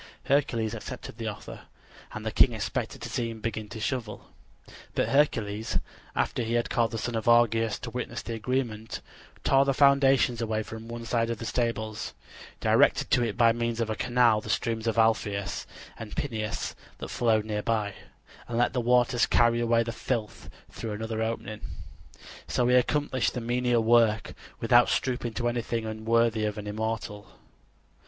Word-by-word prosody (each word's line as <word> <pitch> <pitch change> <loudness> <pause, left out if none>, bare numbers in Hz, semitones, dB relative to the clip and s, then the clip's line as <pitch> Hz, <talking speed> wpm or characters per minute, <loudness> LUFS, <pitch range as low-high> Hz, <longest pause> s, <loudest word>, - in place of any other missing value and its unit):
Hercules 120 -6 +1
accepted 115 - -7
the - - -3
offer, - - -8 0.4
and - - -7
the - - -1
king - - +5
expected - - -3
to - - -5
see 115 -1 -2
him 115 -1 -7
begin 110 -1 -4
to 115 - -7
shovel. 115 -1 -4 0.6
But - - +1
Hercules, 115 -7 +1 0.4
after - - 0
he 115 0 -2
had 120 0 0
called 115 -1 +2
the 115 - -4
son 120 +2 -3
of 110 -1 -2
Augeas 115 -2 +4
to - - -6
witness - - -4
the 115 - -5
agreement, 115 -1 -3 0.4
tore 135 0 +5
the 135 -1 0
foundations 135 -4 +4
away 110 -1 -1
from 110 +1 -9
one 115 0 -6
side 115 0 0
of 115 - -2
the 115 - -6
stables; 110 -3 -2 0.4
directed - - +3
to 120 - +4
it 115 -2 -2
by 115 -1 +6
means 115 0 -2
of 115 -1 0
a - - -1
canal 120 -3 +3
the - - -9
streams 115 -1 -1
of 115 - 0
Alpheus 105 -3 +1 0.3
and 110 -2 -7
Peneus 110 -6 -3 0.2
that - - -7
flowed 110 -3 +2
near 105 -1 -2
by; 105 -3 -1 0.5
and 115 - -3
let 120 - +2
the 125 - 0
waters 120 0 +3
carry 120 0 +3
away 115 0 +3
the 115 - -4
filth 110 -1 -4 0.2
through 110 -2 -5
another 110 +1 -3
opening. 110 -2 -3 0.9
So 125 - +1
he 125 - +3
accomplished 130 +1 +1
the 125 - -2
menial 120 0 +1
work 115 -1 +3 0.3
without 120 +1 +5
stooping 125 -3 -1
to 120 +1 -1
anything 120 -1 -2
unworthy 110 0 +1
of 105 0 -2
an 105 - -6
immortal. 105 -1 -4
115 Hz, 175 wpm, -28 LUFS, 110-120 Hz, 0.9 s, by